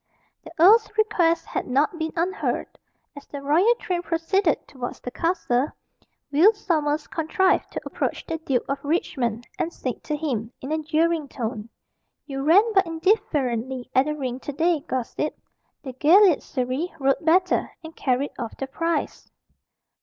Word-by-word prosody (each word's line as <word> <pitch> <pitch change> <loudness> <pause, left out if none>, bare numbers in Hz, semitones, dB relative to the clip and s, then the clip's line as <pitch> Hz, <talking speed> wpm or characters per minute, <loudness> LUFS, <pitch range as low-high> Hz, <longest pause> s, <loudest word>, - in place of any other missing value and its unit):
The 325 - -11
earl's 420 +7 +6
request 350 -7 +2
had - - -4
not 295 +7 +1
been 320 0 -2
unheard. 360 +4 -2 0.4
As 285 - -11
the 285 - -7
royal 350 +12 +4
train 360 -6 -3
proceeded 335 +1 0
towards 250 -3 -6
the 245 - -7
castle, 315 -5 0 0.6
Will 340 +10 +6
Sommers 310 -7 -1
contrived 370 +4 +1
to - - -5
approach - - -3
the 325 -1 -4
Duke 270 -6 -1
of 275 0 -3
Richmond, 245 -7 -1
and 330 - -1
said 255 -7 -5
to 300 - -1
him, 250 -7 -3
in 270 - -6
a 315 0 0
jeering 315 0 +1
tone 230 -4 -5 0.6
"You 270 -2 -5
ran 330 +9 +6
but 385 -3 +4
indifferently 270 - -1
at 260 +1 +4
the 300 - -1
ring 260 -3 -4
to 290 - -6
day, 330 +3 +1
gossip. 260 +3 -3 0.5
The 260 -3 -6
galliard 340 +6 +5
Surrey 260 +6 -3
rode 275 +3 +1
better, 360 +3 +3
and 320 0 -10
carried 265 +2 0
off 230 -3 -5
the 270 - -3
prize." 330 +5 -3
305 Hz, 155 wpm, -24 LUFS, 265-340 Hz, 0.6 s, earl's